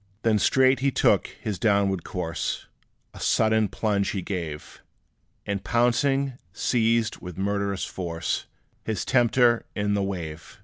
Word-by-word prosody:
Then 110 -2 +3
straight 130 +4 +4
he 140 +1 +2
took - - +3
his 105 -5 -6
downward 100 -3 +2
course; 85 -5 -3 0.5
A - - -11
sudden 110 -1 +3
plunge 100 -1 0
he 95 -3 -3
gave; 85 -6 -5 0.6
And 100 -1 -3
pouncing, 125 +4 +1
seized, 115 +1 +1
with 90 -2 -9
murderous 100 0 -1
force, 85 -2 -3 0.4
His 110 -2 -2
tempter 120 -1 +3
in 105 0 0
the 100 - +1
wave. 85 -2 -5
100 Hz, 130 wpm, -25 LUFS, 95-115 Hz, 0.6 s, straight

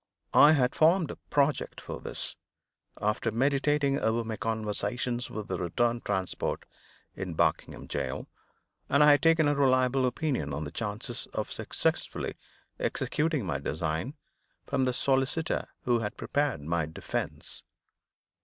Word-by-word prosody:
I 150 +2 +8
had 130 -4 +2
formed 165 +2 +4
a - - -7
project 145 0 +1
for - - -7
this, - - 0 0.6
after 105 +2 0
meditating 140 +3 +2
over 115 +1 +1
my 110 -1 -4
conversations 110 +3 -2
with 110 -1 -5
the 95 -2 -3
returned 115 +7 0
transport 95 -3 -2 0.5
in 90 -3 -5
Barkingham - - 0
jail, - - -3 0.6
and 140 +2 +5
I 150 - +8
had 145 -1 +5
taken 165 -1 +4
a 145 - +3
reliable 130 -2 +3
opinion 125 - -1
on 75 - -3
the 75 - -6
chances 105 -2 -4
of - - -2
successfully - - -2 0.5
executing 150 -6 0
my 75 -6 -1
design 80 - -2 0.5
from 135 -2 +1
the 125 - +1
solicitor 135 +5 +1 0.2
who 120 -2 +2
had 105 -2 -4
prepared 145 - 0
my 80 +1 -1
defense. 80 - -5
125 Hz, 135 wpm, -29 LUFS, 105-140 Hz, 0.6 s, I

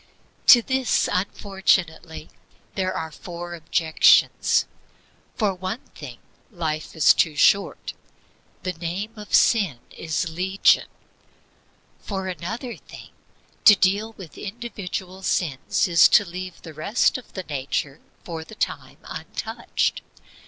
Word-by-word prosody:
To 240 -3 +9
this, 260 0 +1
unfortunately, 180 -5 -1 0.4
there 185 -1 -1
are 160 -3 -4
four 175 +2 -8
objections: 160 -1 +3 0.7
For 210 -4 +1
one 185 +6 -5
thing, - - -9 0.3
life 160 -7 -4
is 160 - +6
too 160 -3 +1
short; 200 +6 +2 0.7
the 185 - -2
name 175 +6 -4
of 210 -2 -2
sin 200 - +3 0.2
is 165 +2 -2
legion. 185 +4 +2 1.1
For 190 -2 -5
another 225 +7 -5
thing, - - -13 0.5
to 210 - +10
deal 200 +4 +1
with 185 -7 -12
individual 195 -4 -6
sins 160 -6 0
is 170 -3 +7
to 205 - +5
leave 180 0 -8
the 160 - -9
rest 200 - +1
of 250 - -18
the 190 - -5
nature 140 -1 -3 0.2
for 165 -2 -6
the 220 - -13
time - - -4
untouched. - - -3
185 Hz, 115 wpm, -23 LUFS, 160-205 Hz, 1.1 s, to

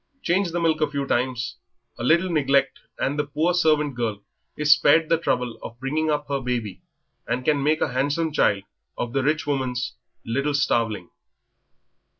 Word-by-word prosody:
Change 185 +1 +1
the 175 - -1
milk 160 -2 +1
a 155 - +2
few 140 -1 -2
times, 125 -2 -1 0.4
a - - -4
little 170 +7 +3
neglect, 140 -3 +2 0.2
and 145 +3 -1
the - - +2
poor 155 +5 0
servant 155 -4 +2
girl 110 -4 -3 0.3
is 150 -1 +2
spared 155 +3 +3
the 165 - +4
trouble 125 -7 -1
of 115 +1 -9
bringing 155 +4 -1
up 150 -1 -1
her 140 -1 -1
baby 120 -6 -3 0.5
and 125 +2 -2
can 150 -2 +2
make 155 +3 +1
a - - 0
handsome 145 +5 0
child 100 -8 +2 0.3
of 120 0 -3
the 135 - +1
rich 150 +3 0
woman's 130 -4 -2 0.3
little 140 +5 0
starveling." 115 -8 0
140 Hz, 170 wpm, -24 LUFS, 125-155 Hz, 0.5 s, the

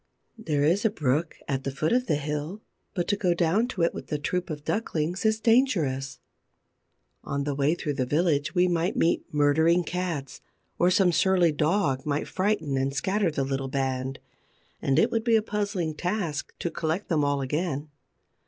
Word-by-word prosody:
There 150 -9 0
is 175 +7 +2
a 220 - +4
brook 155 - -1
at 135 -1 -2
the - - -2
foot 155 - -1
of 250 0 +1
the 150 - +2
hill, 150 +7 -4 0.3
but 175 -2 -1
to 205 - +3
go 180 -4 +1
down 175 +8 +2
to 195 -9 -2
it 170 - +2
with - - -7
the 150 - -1
troop 180 +5 -2
of 150 -2 -6
ducklings 180 -3 -2
is 220 0 +1
dangerous. 160 - +2 1.1
On 140 0 -2
the 145 0 -1
way 140 +4 +1
through 150 -4 -3
the 130 -2 -1
village 155 0 +1
we 180 0 +4
might 175 0 0
meet 165 - +1
murdering 160 +4 +3
cats, 170 -6 -4 0.4
or 175 - +4
some 185 -1 +4
surly 180 0 +3
dog 150 -2 +1
might 145 -1 -1
frighten 185 -8 0
and 135 +1 -1
scatter 195 +4 +1
the 145 -3 -1
little 135 0 -2
band; 130 0 -2 0.6
and 135 - +1
it - - +4
would 225 -1 0
be 230 -1 +3
a 220 - +4
puzzling 200 -6 -2
task 175 -3 -3
to 170 - -3
collect 160 +5 -2
them 155 -4 +1
all 145 0 +1
again. 150 +1 -2
160 Hz, 185 wpm, -26 LUFS, 145-185 Hz, 1.1 s, a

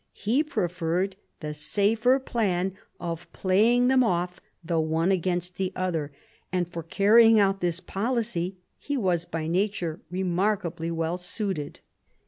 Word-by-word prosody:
He 235 +8 +1
preferred 180 - -1 0.3
the 150 -1 -4
safer 215 - +2
plan 195 -8 -1 0.2
of 170 0 -5
playing 225 +6 +3
them 260 0 +5
off 180 -4 -1 0.2
the 165 0 0
one 160 +3 +1
against 180 -1 -1
the 190 -1 -1
other; 165 -5 -2 0.4
and 180 -2 0
for 170 -1 -6
carrying 220 +6 +5
out 195 -1 +2
this 175 -1 0
policy 195 -4 -2 0.2
he 285 -1 -3
was 180 -7 +1
by 165 -2 -4
nature 175 -1 -1
remarkably 180 -2 -1
well 165 +1 -1
suited. 180 -4 -3
185 Hz, 130 wpm, -26 LUFS, 170-210 Hz, 0.4 s, them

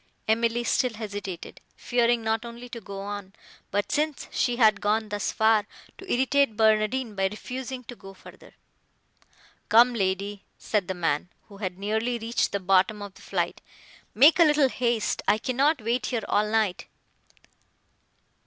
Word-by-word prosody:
Emily 230 +2 +1
still 240 0 0
hesitated; 205 -4 -7
fearing 240 -1 +1
not 220 0 0
only 235 +1 -9
to 235 -1 -8
go 195 -1 -7
on, 200 -1 -6 0.4
but, 205 +1 -1
since 300 -1 -1
she 245 -1 0
had 215 -4 +4
gone 215 +1 0
thus 205 0 -2
far, 220 -2 +3 0.3
to 385 - -8
irritate 265 -2 +2
Barnardine 220 +2 +2
by 195 -1 +1
refusing 255 +5 -6
to 245 +1 -10
go 195 -3 -13
further. - - -16 1.1
"Come, 235 +3 +6
lady," 200 -1 -2
said 205 -5 -1
the 190 - -3
man, 165 -1 -1 0.2
who 200 - -13
had 185 -3 -4
nearly 220 +4 -1
reached 230 +1 -1
the 200 - -1
bottom 195 +3 +2
of 200 -1 -9
the - - -17
flight, - - -2 0.5
"make 300 +8 +6
a - - +9
little 295 -3 +4
haste; 240 -4 -1
I 210 - +4
cannot 265 +3 +1
wait 235 +3 0
here 235 -4 -2
all 210 +1 +1
night." 215 -4 0
220 Hz, 155 wpm, -26 LUFS, 205-245 Hz, 1.1 s, a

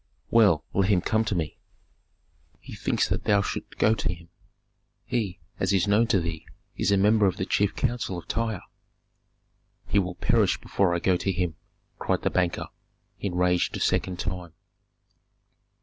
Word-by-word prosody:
"Well, 100 -9 +5
let 95 +1 +2
him 95 -4 +4
come 110 +4 +1
to 105 - -1
me." 80 -3 -3 1.0
"He - - -11
thinks - - 0
that - - -2
thou 100 -2 +3
shouldst - - -5
go 110 - +4
to 110 - -1
him. 85 -1 -10 0.8
He, 100 -7 -2 0.2
as - - +1
is 95 0 +2
known 105 +3 +4
to 100 - +3
thee, 85 -2 -4 0.3
is - - +1
a 100 - +4
member 105 +1 +4
of 95 0 -1
the 95 - -1
chief 100 +1 +1
council 120 -7 -1
of 85 - -9
Tyre." 115 -4 -2 1.2
"He 100 - +2
will 90 -2 -2
perish - - +2
before 90 -3 +1
I - - +2
go 90 +1 +2
to 95 - -1
him," 90 -2 -1 0.5
cried - - -1
the - - +1
banker, 90 -2 0 0.5
enraged 90 -2 +1
a - - -6
second 90 -1 0
time. 90 -2 -4
95 Hz, 165 wpm, -26 LUFS, 90-105 Hz, 1.2 s, Well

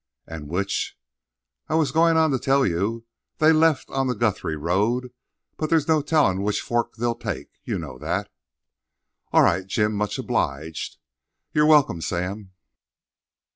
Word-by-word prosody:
"And 80 -3 -8
which—" 95 +4 -2 0.7
"I 155 - +1
was 155 -5 +2
goin' 165 +2 +4
on 160 -2 +4
to 130 - 0
tell 135 +2 +2
you. 100 +7 -1 0.3
They 155 +1 +5
left 155 -2 +3
on 135 -1 0
the 125 - 0
Guthrie 105 -7 -1
road; 105 +11 0 0.4
but 155 - -2
there's 160 -3 +2
no 160 -2 +3
tellin' 140 - +2
which 105 +1 0
forks 120 -1 -2
they'll 120 +1 0
take—you 110 -5 -5
know 70 -6 -7
that." - - -3 1.0
"All - - +6
right, 95 +2 +2
Jim; 105 +2 +1
much 105 0 -2
obliged." 75 +4 -3 0.6
"You're 150 0 +4
welcome, 145 - +4
Sam." 95 +4 -3
115 Hz, 145 wpm, -24 LUFS, 95-150 Hz, 1.0 s, All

